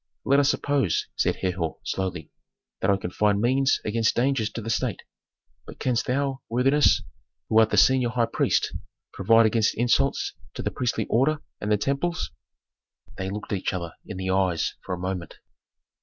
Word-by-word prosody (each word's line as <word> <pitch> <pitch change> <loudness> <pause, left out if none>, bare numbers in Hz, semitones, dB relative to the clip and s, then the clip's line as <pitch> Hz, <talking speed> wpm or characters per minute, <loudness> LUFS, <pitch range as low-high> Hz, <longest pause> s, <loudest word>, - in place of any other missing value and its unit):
"Let 140 +1 +4
us 140 -1 +3
suppose," 140 - +1
said - - +1
Herhor, 90 -3 -2
slowly, 95 -3 -4 0.5
"that 95 - +1
I 100 - +4
can 90 -2 -5
find 105 +1 +2
means 130 +4 +2
against 110 +1 +1
dangers 125 -3 +1
to 115 - -4
the 115 - -2
state. - - -2 0.6
But - - -10
canst 125 -3 0
thou, 135 0 -1
worthiness, 135 +5 +3 0.5
who 110 - +5
art 110 -1 +5
the - - 0
senior 130 -2 +5
high 120 -1 +1
priest, - - 0 0.4
provide 115 +4 +4
against 110 0 +2
insults 125 +4 +1 0.2
to - - -5
the - - -1
priestly 125 -3 -1
order 150 +6 +1 0.2
and 105 - -3
the 105 - +4
temples?" 145 - -1 0.9
They 95 0 -2
looked 105 +1 -5
each 95 -1 -1
other 85 -3 -4
in 105 - -8
the 95 0 -2
eyes 95 -3 +1
for 90 - -3
a - - -10
moment. 90 -2 -4
115 Hz, 170 wpm, -25 LUFS, 95-130 Hz, 0.9 s, who